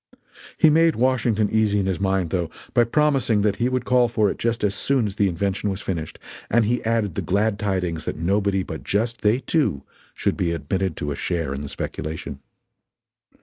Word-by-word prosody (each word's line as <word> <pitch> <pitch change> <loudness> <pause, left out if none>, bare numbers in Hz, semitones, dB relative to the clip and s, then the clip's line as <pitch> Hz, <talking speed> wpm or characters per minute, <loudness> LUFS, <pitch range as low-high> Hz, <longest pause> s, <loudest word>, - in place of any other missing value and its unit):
He 155 - +6
made 165 +1 +4
Washington 115 -4 +2
easy 110 -2 +2
in 95 - 0
his 95 -1 -1
mind, 95 -4 0
though, 85 -3 -1 0.2
by 120 -1 +4
promising 130 -5 +2
that 100 -2 +1
he 120 +1 +1
would 130 -1 -1
call 125 -1 +4
for 105 -3 +1
it - - -8
just 115 -1 -1
as 100 -1 +2
soon 130 +3 +1
as 100 -2 -4
the 100 -2 +3
invention 100 +3 -1
was 95 0 -3
finished, 85 -6 -4 0.3
and 115 0 +3
he 120 +3 0
added 110 -4 0
the - - -2
glad 100 +2 0
tidings 90 -5 -2
that - - -3
nobody 95 +3 +1
but 80 -3 -7
just 115 +3 -1
they 105 +3 +3
two 135 - 0 0.3
should - - 0
be 85 -2 0
admitted 85 +3 -2
to 75 - -3
a - - -2
share 80 -3 -2
in 70 - -5
the 70 - -6
speculation. 75 -2 -5
100 Hz, 200 wpm, -23 LUFS, 90-115 Hz, 0.3 s, He